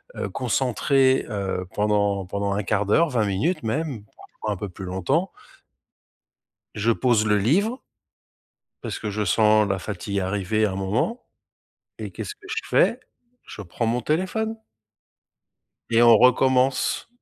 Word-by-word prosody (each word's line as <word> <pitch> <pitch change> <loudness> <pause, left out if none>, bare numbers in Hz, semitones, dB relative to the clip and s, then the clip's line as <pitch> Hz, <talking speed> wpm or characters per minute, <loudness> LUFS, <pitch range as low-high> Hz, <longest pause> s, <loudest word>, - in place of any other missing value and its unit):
heu, - - -3
concentré, 130 +2 +1
heu, 95 -3 -3
pendant 100 -2 +1
pendant 100 +2 -3
1/4 105 +1 0
d'heure, 160 +12 +3
20 120 -6 +1
minutes 105 - -1
même 130 -1 -3
parfois 110 - -7
un 100 - -3
peu 100 +3 -5
plus 95 +1 -10
longtemps. 135 - -1 1.4
Je 110 +2 +1
pose 115 -3 +2
le 105 0 +3
livre 200 - +1 1.0
parce - - -4
que 105 - -4
je 105 +1 -2
sens 105 +2 +3
la 95 - -1
fatigue 100 +1 -4
arriver 100 +3 0
à 105 - 0
un - - -5
moment 105 - -2 0.7
et - - -6
qu'est-ce 420 - -6
que 415 - -17
je - - -3
fais? - - +3 0.5
Je - - -10
prends 100 +6 -3
mon 120 +2 0
téléphone. 190 - -1 1.3
Et 115 0 +4
on 115 -2 +7
recommence! 130 - +2
110 Hz, 145 wpm, -23 LUFS, 100-130 Hz, 1.4 s, on